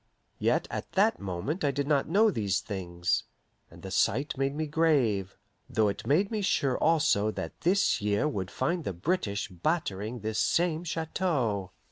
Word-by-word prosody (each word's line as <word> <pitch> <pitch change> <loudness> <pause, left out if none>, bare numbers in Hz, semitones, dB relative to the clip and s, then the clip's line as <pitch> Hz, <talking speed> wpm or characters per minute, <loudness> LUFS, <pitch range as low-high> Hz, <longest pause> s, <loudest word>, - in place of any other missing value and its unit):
Yet - - +1
at - - -5
that 210 +3 +3
moment 100 - -3
I 145 - +3
did 140 +1 -2
not 145 -1 +2
know 210 +5 +4
these 100 - 0
things, 90 -4 -2 0.4
and 85 +1 -15
the 95 - -6
sight 135 +10 +1
made 135 +1 -1
me 155 +1 -1
grave, 140 - +1 0.3
though 110 -2 +2
it 100 - -5
made 185 +9 +2
me 215 -2 -1
sure 140 -9 +1
also 145 -10 +3
that - - -6
this 185 - +2
year 105 +6 +1
would 95 -10 -3
find 170 -1 -1
the 100 - -3
British 100 - -1
battering 105 - -2
this 110 0 -2
same 165 +8 +1
Chateau. 150 - -1
135 Hz, 165 wpm, -29 LUFS, 100-165 Hz, 0.4 s, know